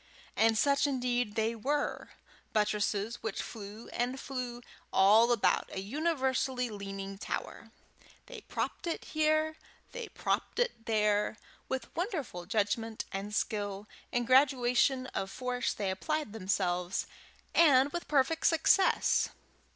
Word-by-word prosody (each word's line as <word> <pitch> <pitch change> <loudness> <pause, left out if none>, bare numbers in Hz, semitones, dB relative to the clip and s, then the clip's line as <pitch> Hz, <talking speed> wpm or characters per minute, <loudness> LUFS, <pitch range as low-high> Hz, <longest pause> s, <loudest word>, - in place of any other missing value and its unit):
And 225 0 +4
such 280 +4 +3
indeed 245 -5 -1
they 225 +1 +1
were 285 +6 -2 0.4
buttresses 210 +1 0
which 220 -3 -3
flew 215 0 -7
and 250 +2 -2
flew 250 -3 -5 0.3
all 215 +5 +6
about 235 -4 +2
a - - -4
universally 260 - 0
leaning 195 -1 -6
tower. - - -5 0.6
They - - -9
propped 400 - -4
it 335 - -3
here, 310 0 +1 0.3
they 485 -2 -6
propped - - -2
it 485 - -1
there; 210 -1 +2 0.3
with 260 -3 -4
wonderful 305 - -3
judgment 220 +1 -1
and 195 +2 -4
skill 205 -2 -2 0.2
and 245 0 0
graduation 255 0 +4
of 195 - -2
force 250 +2 -2
they 200 -2 -2
applied 305 +4 -2
themselves, 185 -3 -1 0.5
and 285 -4 +6
with 345 - -4
perfect 295 +3 +2
success. 360 +3 +3
240 Hz, 120 wpm, -31 LUFS, 210-280 Hz, 0.6 s, all